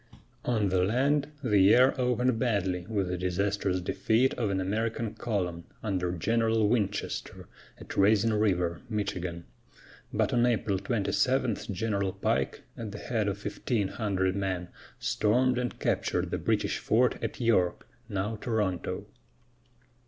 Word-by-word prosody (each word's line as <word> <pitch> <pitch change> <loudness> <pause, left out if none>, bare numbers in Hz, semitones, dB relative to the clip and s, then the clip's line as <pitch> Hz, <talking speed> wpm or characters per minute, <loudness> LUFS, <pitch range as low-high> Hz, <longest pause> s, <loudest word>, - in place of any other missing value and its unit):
On 110 -5 +1
the 90 -1 +2
land, 140 +8 +2 0.2
the 105 -5 +3
year 120 +7 +6
opened 125 -1 +1
badly 95 -7 0
with 100 -4 0
the 90 0 -3
disastrous 95 +1 0
defeat 115 +7 +2
of 110 -4 -1
an 95 -1 0
American 110 +3 -1
column, 90 -7 -3 0.2
under 90 -4 -1
General 110 +4 +2
Winchester, 105 -3 -2 0.3
at - - -9
Raisin 105 +3 +4
River, 90 -5 +1
Michigan; 90 -5 -3 0.7
but - - +1
on 120 - +3
April 105 -5 +1
27 115 +4 +1 0.2
General 100 -1 -1
Pike, 95 - -1
at 110 -3 -6
the 105 - -7
head 110 -1 -1
of 100 0 -1
fifteen 105 0 -2
hundred 95 -4 0
men, 95 -3 -2 0.3
stormed 125 +4 +2
and 125 -1 -3
captured - - 0
the - - -1
British - - 0
fort 125 +3 +2
at - - -3
York, 105 -8 +1 0.2
now 105 +2 -2
Toronto. 105 -6 -2
105 Hz, 135 wpm, -29 LUFS, 95-115 Hz, 0.7 s, year